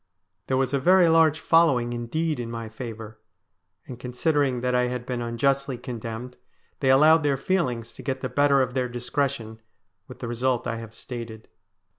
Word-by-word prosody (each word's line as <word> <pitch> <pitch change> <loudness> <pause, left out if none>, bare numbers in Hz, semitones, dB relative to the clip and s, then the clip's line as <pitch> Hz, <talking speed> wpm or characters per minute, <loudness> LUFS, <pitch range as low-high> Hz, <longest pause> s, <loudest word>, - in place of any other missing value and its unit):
There 130 - +1
was 130 0 0
a 140 - +2
very 180 +5 +5
large 160 -1 +4
following 140 -9 +3
indeed 150 +6 -2
in 120 -1 -4
my 115 -1 -6
favour, 110 -2 -8 0.7
and, 125 -2 -9
considering 130 0 0
that 125 0 0
I 125 0 +3
had 125 -1 -4
been 125 -1 -3
unjustly 135 +3 0
condemned, 120 0 -7 0.4
they 135 - +1
allowed 155 +5 +6
their 145 -2 +1
feelings 130 - -1
to - - -11
get 130 -1 -3
the 130 - -2
better 140 +1 +3
of 125 -1 -4
their 125 -1 -1
discretion, 120 -2 -3 0.5
with - - -11
the 120 - -6
result 125 +1 -1
I 115 - -2
have 115 -1 -9
stated. 115 -3 -8
125 Hz, 175 wpm, -25 LUFS, 120-140 Hz, 0.7 s, allowed